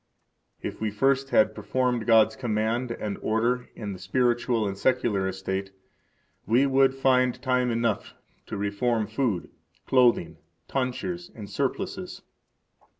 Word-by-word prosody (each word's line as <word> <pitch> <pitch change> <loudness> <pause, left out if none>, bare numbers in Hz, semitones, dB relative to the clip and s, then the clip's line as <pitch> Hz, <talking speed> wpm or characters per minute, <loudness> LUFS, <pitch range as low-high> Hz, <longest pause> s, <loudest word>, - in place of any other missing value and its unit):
If - - -5
we 110 - 0
first 135 +5 +1
had 110 -3 +4
performed 125 -1 -1
God's 110 -1 +5
command 115 +1 -1
and 105 -3 -4
order 120 +3 0
in 105 -2 -5
the 95 - -9
spiritual 120 +2 +1
and 100 - -3
secular 100 -3 +1
estate, 95 +1 -3 0.8
we 120 +6 +4
would 135 -1 +3
find 130 -2 +2
time 125 -2 +1
enough 115 -3 -1 0.3
to 105 - -5
reform 105 +3 0
food, 110 -3 -2 0.3
clothing, 120 -11 +3 0.3
tonsures, 155 +7 -3
and 105 -3 -8
surplices. - - -3
115 Hz, 125 wpm, -26 LUFS, 105-130 Hz, 0.8 s, God's